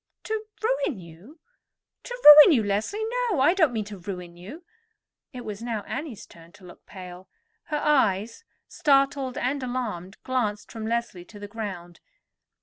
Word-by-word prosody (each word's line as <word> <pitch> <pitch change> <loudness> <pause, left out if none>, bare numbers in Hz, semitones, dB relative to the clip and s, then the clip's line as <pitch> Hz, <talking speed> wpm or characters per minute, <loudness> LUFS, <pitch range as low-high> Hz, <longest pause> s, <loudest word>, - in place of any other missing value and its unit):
"To 440 0 -4 0.2
ruin 445 - 0
you—to 295 - -14
ruin 300 +2 +11
you, 225 - +1
Leslie? 210 - -2 0.2
No; 375 -10 0
I 295 +6 +4
don't 325 -8 +3
mean 220 -3 -3
to 205 -1 -9
ruin 180 -2 -8
you." 210 - -11 0.7
It 250 -3 -9
was 210 0 -7
now 230 -3 -4
Annie's 265 -5 -6
turn 165 0 -17
to 190 - -17
look 175 - -16
pale; 180 -1 -11 0.4
her 300 - -3
eyes, 225 - +1 0.2
startled 275 -2 +1
and 270 +3 -2
alarmed, 220 -7 -5
glanced 220 -5 -2
from 220 -1 -6
Leslie 230 -6 -3
to 210 - -14
the 205 0 -8
ground. 190 -6 -7
225 Hz, 150 wpm, -25 LUFS, 195-285 Hz, 0.7 s, ruin